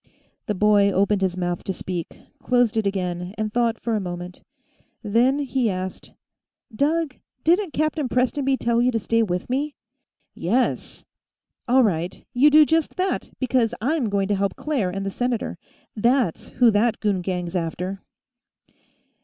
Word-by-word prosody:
The 210 - -1
boy 205 0 +4
opened 200 +1 +1
his 185 -1 0
mouth 175 -1 -2
to 190 - -2
speak, 175 -2 -6 0.2
closed 245 -3 +2
it 220 -2 +1
again, 180 -1 -3
and 215 -1 -2
thought 235 -1 +1
for 230 - -2
a - - +1
moment. 180 -1 -6 0.6
Then 235 +6 +3
he 265 -4 0
asked: 185 -1 -5 0.6
"Doug, 300 +2 0 0.3
didn't 350 +1 +2
Captain 310 -3 0
Prestonby 265 +2 +1
tell 235 -1 +1
you 245 - +3
to 230 - 0
stay 230 +1 +1
with 180 -5 -1
me?" 280 +4 -2 0.6
"Yes 235 +9 -1 0.3
" - - -57
"All 260 +1 +5
right. 180 -3 -1
You 270 +5 +6
do 305 +1 +7
just 320 0 0
that, 375 +1 -1
because 250 -3 +1
I'm 265 0 0
going 200 -1 0
to 205 - +2
help 195 0 -1
Claire 270 -12 -1
and 195 +2 -4
the 195 - -2
senator. 245 +1 -2 0.4
That's 235 -4 +1
who 240 -2 +4
that 220 +2 +2
goon 200 -4 0
gang's 180 -1 -3
after." 180 +3 -3
220 Hz, 160 wpm, -23 LUFS, 190-260 Hz, 0.6 s, do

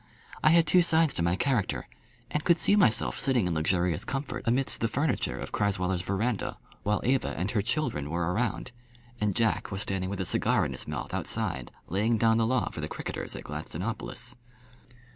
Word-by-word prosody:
I 155 - +7
had 165 0 +6
two 180 +3 +5
sides 165 -3 +3
to - - -2
my 85 +1 +2
character, 115 -2 0 0.4
and 150 - -1
could 170 -1 +4
see 200 - +5
myself 120 - +3
sitting 130 -7 +2
in 90 - 0
luxurious 85 +1 +1
comfort 135 +2 -3
amidst 130 +3 +2
the 115 - +3
furniture 140 +4 0
of - - -6
Crasweller's 95 -3 0
verandah 100 +5 -1 0.2
while 105 +1 0
Eva 130 +2 +1
and 95 +3 -1
her 105 - +1
children 100 - -1
were 85 +2 -1
around, 120 +3 -1 0.5
and 105 -3 0
Jack 115 -1 +1
was 95 -1 -4
standing 95 -1 -1
with 100 0 -4
a 95 - 0
cigar - - +2
in - - -3
his - - -5
mouth - - -5
outside - - -2 0.2
laying 110 +6 +1
down 115 0 +4
the 110 - +2
law 125 -1 +1
for 80 - -6
the 75 - -4
cricketers - - -5
at - - -7
Gladstonopolis. 90 +10 -4
110 Hz, 190 wpm, -28 LUFS, 90-130 Hz, 0.5 s, I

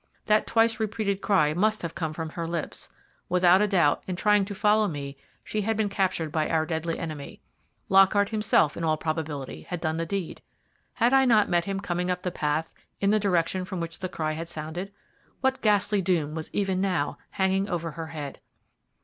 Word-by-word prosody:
That 215 -1 +3
twice 225 0 +2
repeated 210 -2 -1
cry 155 -7 +3
must 215 +5 +1
have 165 -1 -4
come 160 -3 -3
from 160 0 -5
her 165 +1 -5
lips. 165 -2 -5 0.4
Without 180 +3 +4
doubt, 170 -7 +3
in 185 - -2
trying 210 +1 +3
to 200 0 -6
follow 210 +1 +3
me 140 -5 -5 0.3
she 215 - -2
had 220 +1 -1
been 215 -2 +1
captured 190 -6 -1
by 155 -1 0
our 160 -1 +1
deadly 165 0 -2
enemy. 155 -4 -6 0.5
Lockhart 195 +1 +5
himself, 210 -8 +2
in 170 - -5
all 155 -1 +2
probability, 155 -4 -4
had 180 - -5
done 160 -1 -1
the 165 0 -2
deed. 195 -2 -4 0.5
Had 240 +2 +2
I 270 0 +6
not 215 -5 +4
met 175 -1 +2
him 195 -1 -2
coming 180 -2 -2
up 180 0 -2
the 180 - -1
path 155 0 -1 0.3
in 200 0 +2
the 215 - +3
direction 185 -2 +1
from 185 0 -5
which 165 -1 -5
the 185 -1 -4
cry 155 -3 -2
had 165 +2 -5
sounded? 170 +4 -5 0.5
What 265 0 +1
ghastly 210 -1 +2
doom 170 -5 0
was 160 -1 -5
even 190 -2 0
now 180 -7 -1
hanging 195 +1 +1
over 170 -2 -2
her 165 +1 -6
head? 150 -4 -7
180 Hz, 195 wpm, -26 LUFS, 160-200 Hz, 0.5 s, I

